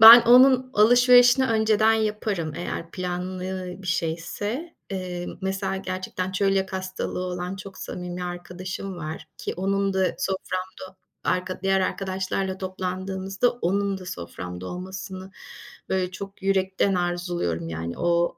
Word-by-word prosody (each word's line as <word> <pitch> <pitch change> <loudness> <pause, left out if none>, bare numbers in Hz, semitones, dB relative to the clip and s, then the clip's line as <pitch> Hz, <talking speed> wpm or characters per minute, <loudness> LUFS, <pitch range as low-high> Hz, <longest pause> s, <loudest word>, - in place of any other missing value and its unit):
ben 230 +2 +13
onun 255 +1 +6
alışverişini 245 +3 +7
önceden 220 -1 +4
yaparım. 210 -7 -1
Eğer 170 -1 -4
planlı 185 0 -4
bir 190 - -9
şeyse, 180 - -2 0.2
eee, 180 -2 -4 0.2
mesela, 190 0 -1
gerçekten 185 -1 -3
çölyak 195 0 +1
hastalığı 185 -1 -3
olan 180 +1 -3
çok 195 0 -9
samimi 180 0 -5
arkadaşım 180 +2 -5
var 155 -2 -6
-ki - - -4
onun 195 +1 0
da 190 -1 +2
soframda 185 0 -4 0.3
arka 185 0 -1
diğer 195 0 +3
arkadaşlarla 190 0 -1
toplandığımızda 190 +3 -1
onun 200 -2 0
da 185 - -10
soframda 90 - -6
olmasını, 185 - -6 0.6
böyle, 185 -1 0
çok 195 +1 -8
yürekten 195 0 +2
arzuluyorum 175 - -1
yani, 80 +1 -4
o- 170 0 +2
190 Hz, 120 wpm, -25 LUFS, 180-195 Hz, 0.6 s, ben